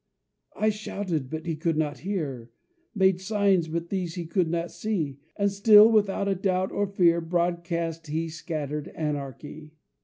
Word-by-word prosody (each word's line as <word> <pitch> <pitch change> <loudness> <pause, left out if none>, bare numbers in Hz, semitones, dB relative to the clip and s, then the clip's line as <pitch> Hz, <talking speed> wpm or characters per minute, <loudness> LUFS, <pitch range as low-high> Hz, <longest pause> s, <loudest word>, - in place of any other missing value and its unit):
I 215 0 +2
shouted, 195 -9 -4
but 160 +2 -5
he 165 -2 -2
could 160 0 -1
not 150 -2 -1
hear; 145 - -4 0.5
Made 190 -2 +3
signs, 195 -4 +2
but 170 +1 -4
these 180 -3 -3
he 175 -2 -4
could 170 0 0
not 170 +1 -2
see; 160 -11 -3 0.2
And 200 0 +1
still, 210 +2 +7
without 200 -2 +2
a 200 - +2
doubt 185 0 0
or 205 0 0
fear, 175 -3 +3
Broadcast 170 -1 -2
he 160 +2 -2
scattered 150 -3 -4
anarchy. 150 0 -5
170 Hz, 155 wpm, -26 LUFS, 160-195 Hz, 0.5 s, still